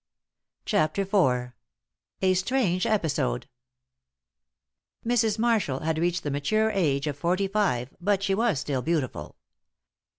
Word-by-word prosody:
CHAPTER 155 +6 +1
IV. 130 -11 +1 0.7
A 185 0 +4
STRANGE 185 -2 +1
EPISODE. 160 - 0 1.6
Mrs. 225 -3 +2
Marshall 220 - +1
had 160 0 -1
reached 175 +1 0
the 145 - -2
mature 215 +11 +1
age 150 -9 +1
of 150 -2 -2
forty 180 +6 0
five, 190 -12 -1
but 200 +1 +1
she 195 -1 +1
was 210 - +1
still 140 -3 -2
beautiful. 130 - -2
180 Hz, 120 wpm, -26 LUFS, 145-205 Hz, 1.6 s, A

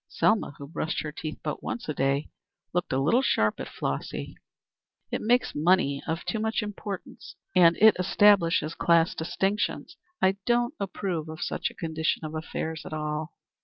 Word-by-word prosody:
Selma, 215 -9 +1
who 140 - -8
brushed 160 +1 -2
her 150 - -4
teeth 155 0 -6
but 150 - -3
once 240 - -5
a 155 - -1
day, 135 +1 0 0.5
looked 175 0 -1
a 130 - +1
little 165 - +3
sharp 110 - +1
at - - -5
Flossy. 70 - -4 0.8
"It - - -2
makes 245 +3 +2
money 150 -3 +2
of 165 +2 -2
too 220 - -1
much 220 0 0
importance 205 -2 -7 0.2
and 170 -2 +6
it 220 +1 +7
establishes 180 -4 +4
class 170 0 +3
distinctions. 195 - -2 0.2
I 190 +1 +3
don't 240 +2 +2
approve 180 -5 -3
of 160 0 -5
such - - -2
a - - -16
condition 160 -1 -1
of 155 - -6
affairs 160 0 -4
at - - -8
all." 150 +1 -3
165 Hz, 165 wpm, -27 LUFS, 155-200 Hz, 0.8 s, it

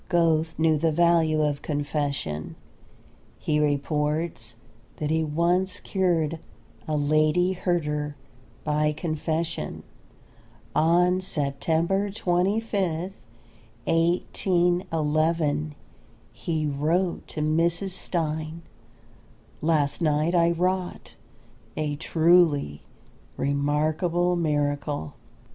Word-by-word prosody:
Goethe 165 -2 +2
knew 160 -1 +3
the 165 +1 +2
value 165 -1 +3
of 145 -1 -1
confession. 145 - -3 0.8
He 150 -1 0
reports 150 -1 -1 0.4
that 150 0 -2
he 160 0 +2
once 170 +5 0
cured 165 -5 0 0.5
a 155 -1 0
Lady 155 +5 +2
Herder 150 -5 -1 0.5
by 150 0 +1
confession. 160 +1 -3 0.9
On 180 +3 +3
September 165 +5 0
25th, 190 -2 0 0.7
1811, 165 -3 +1 0.6
he 160 -2 -2
wrote 160 +6 0
to 155 - -5
Mrs. 165 +5 +1
Stein: 160 -2 -2 1.0
"Last 150 -2 +1
night 155 +1 +2
I 170 -1 +4
wrought 180 +2 -2 0.6
a 150 -1 -1
truly 160 - +3 0.6
remarkable 155 +5 +1
miracle. 145 - -1
160 Hz, 80 wpm, -25 LUFS, 150-175 Hz, 1.0 s, I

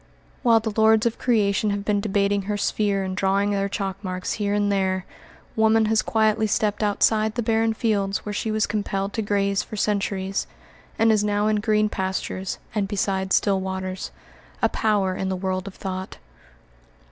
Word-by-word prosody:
While 230 -2 +5
the 220 -1 -4
lords 220 0 +4
of 235 - 0
creation 210 -3 +2
have 200 0 -2
been 205 -1 +1
debating 200 -1 +1
her 205 - 0
sphere 200 -1 0
and 185 0 -3
drawing 195 +1 +1
their 200 0 0
chalk 195 0 -4
marks 185 -1 -3
here 205 0 0
and 205 0 +1
there, 190 -2 0 0.5
woman 220 0 +4
has 220 0 +2
quietly 220 0 +2
stepped 210 -1 0
outside 215 +1 +2
the 240 - -1
barren 225 0 +2
fields 200 -4 0
where 210 - -4
she 220 - -2
was 215 0 +1
compelled 200 -1 -2
to 225 - -1
graze 200 -1 +1
for - - -8
centuries, 195 -2 -1 0.5
and 225 0 +4
is 210 -1 +3
now 205 0 +1
in 215 0 +2
green 215 0 +2
pastures 190 -1 -3 0.2
and 205 -2 0
beside 190 -1 -1
still 195 0 +3
waters, 190 0 -4 0.5
a - - +2
power 205 -4 +1
in 190 0 -2
the 190 - -1
world 185 0 -3
of 195 - -8
thought. 190 -1 -5
205 Hz, 180 wpm, -24 LUFS, 195-215 Hz, 0.5 s, While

